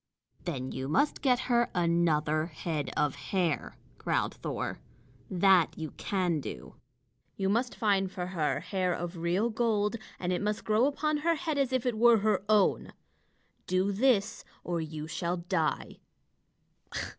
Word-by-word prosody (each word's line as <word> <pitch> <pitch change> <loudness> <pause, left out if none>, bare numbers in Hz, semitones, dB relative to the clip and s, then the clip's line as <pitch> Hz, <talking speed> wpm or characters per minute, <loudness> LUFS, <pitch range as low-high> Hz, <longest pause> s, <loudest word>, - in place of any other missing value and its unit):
"Then 130 -7 -3
you 130 0 -4
must 180 - +1
get 255 -2 +3
her 240 -1 +2
another 160 -3 +2
head 155 -3 -3
of 150 -2 +2
hair," 150 +4 -2 0.2
growled - - 0
Thor. - - -4 0.5
"That 185 -2 +4
you 160 -2 -5
can 180 -5 -1
do. 60 - -8 0.6
You 195 0 0
must 235 +4 0
find 195 -3 +1
for 180 -2 -4
her 155 -4 0
hair 185 -2 -1
of 175 +1 -5
real 180 +8 0
gold, 220 -1 +1 0.2
and 180 0 -1
it 180 - -1
must 210 +1 -2
grow 220 +4 +3
upon 305 +1 0
her 330 +3 +1
head 315 -3 -2
as 270 -2 +1
if 255 -1 0
it 235 -3 0
were 235 0 +7
her 210 -2 +1
own. 210 -2 +3 0.7
Do 185 +2 +1
this, 225 -1 +2 0.2
or 170 -1 -2
you 155 -1 -6
shall 170 +2 -2
die." 170 -3 -2
190 Hz, 150 wpm, -30 LUFS, 165-225 Hz, 0.7 s, were